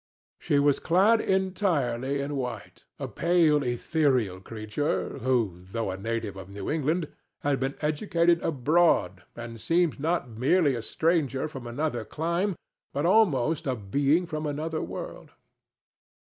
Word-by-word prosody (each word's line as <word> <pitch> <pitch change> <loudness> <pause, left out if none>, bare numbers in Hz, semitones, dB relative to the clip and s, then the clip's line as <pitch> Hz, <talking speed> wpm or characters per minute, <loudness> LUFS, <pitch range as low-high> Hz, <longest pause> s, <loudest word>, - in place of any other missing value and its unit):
She 145 - +1
was 140 0 +3
clad 200 +7 +4
entirely 145 - 0
in 145 +1 -3
white—a 125 -2 -6
pale, 165 -4 +3
ethereal 125 - 0
creature 110 +8 -3
who, 115 -8 0
though 95 +3 -3
a 95 - -5
native 115 0 -3
of 95 0 -9
New 100 0 -5
England, 160 +2 0 0.3
had 140 -2 +1
been 135 +1 -2
educated 170 +2 +2
abroad 160 +4 +2
and 115 -2 -8
seemed 170 -3 +1
not 165 -1 0
merely 135 +7 +2
a 120 - -3
stranger 155 -1 0
from 135 -5 -8
another 120 -1 -2
clime, 170 - -1 0.4
but 145 +3 -1
almost 165 - +3
a 130 - +1
being 140 - +1
from 155 -2 -4
another 155 +2 -3
world. - - -7
145 Hz, 130 wpm, -27 LUFS, 120-165 Hz, 0.4 s, clad